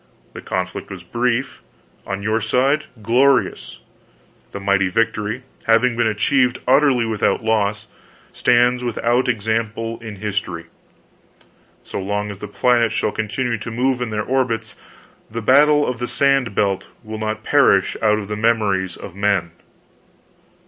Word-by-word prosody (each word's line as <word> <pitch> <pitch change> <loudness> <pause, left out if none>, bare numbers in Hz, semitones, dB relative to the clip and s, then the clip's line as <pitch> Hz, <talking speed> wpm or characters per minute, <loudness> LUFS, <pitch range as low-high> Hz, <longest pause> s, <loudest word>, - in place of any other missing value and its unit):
The - - -8
conflict 90 0 -4
was 95 -3 -8
brief; 120 +6 -1 0.5
on 95 0 -4
your 110 +2 0
side, 130 +7 +1 0.2
glorious. 130 +5 +2 0.7
This 100 - -6
mighty 100 -1 +1
victory, 110 +3 -1 0.2
having 115 +2 +3
been 120 -1 +1
achieved 125 +4 +2
utterly 130 -2 +4
without 110 +1 0
loss, 105 -1 0 0.5
stands 125 0 +3
without 120 +2 0
example 115 0 -2
in 110 -2 -7
history. 100 -4 -4 1.2
So - - -6
long 105 +2 -2
as 100 - -10
the 105 - -6
planets 120 +1 +2
shall - - 0
continue 115 +2 -2
to 110 - -6
move 125 +2 0
in 125 - -2
their 105 0 -2
orbits, 125 -3 -1 0.5
the 115 - -4
Battle 145 +4 +5
Of 125 -2 -3
The 120 - -2
Sand 135 -7 +1
Belt 95 -2 0 0.2
will 110 0 -7
not 110 0 -3
perish - - +3
out 105 -1 +3
of 105 -2 -5
the 105 - -3
memories 105 -5 0
of 90 - -10
men. 100 -4 0
110 Hz, 140 wpm, -20 LUFS, 105-125 Hz, 1.2 s, Battle